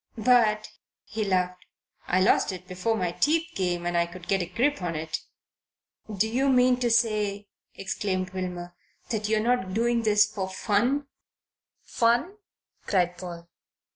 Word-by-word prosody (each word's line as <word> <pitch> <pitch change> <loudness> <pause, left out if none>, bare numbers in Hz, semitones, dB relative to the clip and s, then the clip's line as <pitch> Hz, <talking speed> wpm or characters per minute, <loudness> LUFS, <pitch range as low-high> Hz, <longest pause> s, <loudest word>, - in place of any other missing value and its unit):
"But," 220 -2 +3 0.4
he 220 0 -4
laughed, 180 -2 0 0.4
"I 185 +1 +2
lost 190 - +3
it 185 -1 -9
before 185 +5 -1
my 180 -3 -1
teeth 325 - +1
came 175 -2 -1
and 175 0 -1
I 170 0 +2
could 175 0 -11
get 195 -1 +1
a 175 - -3
grip 245 +8 0
on 170 -2 -2
it." 155 0 -3 1.0
"Do 215 +4 +2
you 260 +5 +1
mean 250 -1 +4
to 245 -1 +1
say," 210 -3 +1 0.3
exclaimed 190 -1 -3
Wilmer, 180 -2 -5 0.4
"that 210 -2 -1
you're 220 0 +2
not 215 -5 0
doing 235 +1 +2
this 210 -2 +4
for 200 -3 -4
fun?" 235 +9 0 0.8
"Fun?" 240 - +1 0.5
cried 180 -3 +1
Paul. 170 -2 -8
205 Hz, 150 wpm, -26 LUFS, 180-230 Hz, 1.0 s, mean